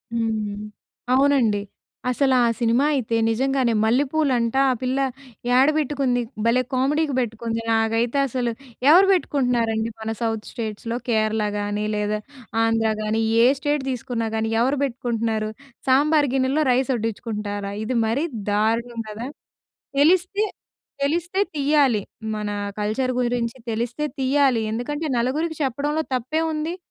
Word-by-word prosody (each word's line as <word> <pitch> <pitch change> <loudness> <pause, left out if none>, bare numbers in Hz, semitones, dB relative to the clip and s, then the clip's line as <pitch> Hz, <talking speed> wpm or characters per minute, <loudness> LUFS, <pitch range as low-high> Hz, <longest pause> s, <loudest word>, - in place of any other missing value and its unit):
హ్మ్. 215 -3 -2 0.5
అవునండి. 260 -6 +3 0.5
అసలా 260 +1 +2 0.2
సినిమా 240 +3 +3
అయితే 240 -5 0
నిజంగానే 260 +1 +1
మల్లెపూలంట! 260 0 +1
ఆ - - +3
పిల్ల 255 +1 0 0.6
ఏడబెట్టుకుంది? 275 -3 +2 0.2
భలే 235 +2 +4
కామెడీకి 285 +3 +1
పెట్టుకుంది! 230 -1 -2
నాకైతే 225 +3 +1
అసలు 245 -1 -1 0.4
ఎవరు 365 +5 +7
పెట్టుకుంటున్నారండి? 240 - +1
మన 220 0 -3
సౌత్ 225 -2 -2
స్టేట్స్‌లో 230 0 -4
కేరళ 215 -1 +1 0.2
గాని, 205 +1 -2
లేదా 210 0 0 0.5
ఆంధ్ర 225 -1 +2
గాని, 215 +1 0 0.2
ఏ - - +7
స్టేట్ 290 0 0
తీసుకున్నా 245 -2 -3
గాని, 220 0 0
ఎవరు 265 +3 +1
పెట్టుకుంటున్నారు? 230 -4 -1 0.4
సాంబార్ 290 +2 +4
గిన్నెలో, 270 +3 +2
రైస్ 260 +1 +2
వడ్డించుకుంటారా? 210 -3 -3
ఇది 245 +3 -1
మరీ 245 +7 0 0.3
దారుణం 230 +3 0
కదా! 220 +4 -6 0.7
తెలిస్తే, 365 +7 +3 0.6
తెలిస్తే 345 +6 0 0.2
తీయాలి. 280 -6 +3 0.4
మన 210 -1 -3 0.3
కల్చర్ 220 +5 0
గురించి 240 0 -1
తెలిస్తే 235 +5 -2 0.2
తీయాలి. 265 -2 +3
ఎందుకంటే 290 +8 -3
నలుగురికి 305 +7 -1
చెప్పడంలో 290 +4 -1
తప్పేముంది! 310 +5 -1
245 Hz, 115 wpm, -23 LUFS, 225-280 Hz, 0.7 s, ఎవరు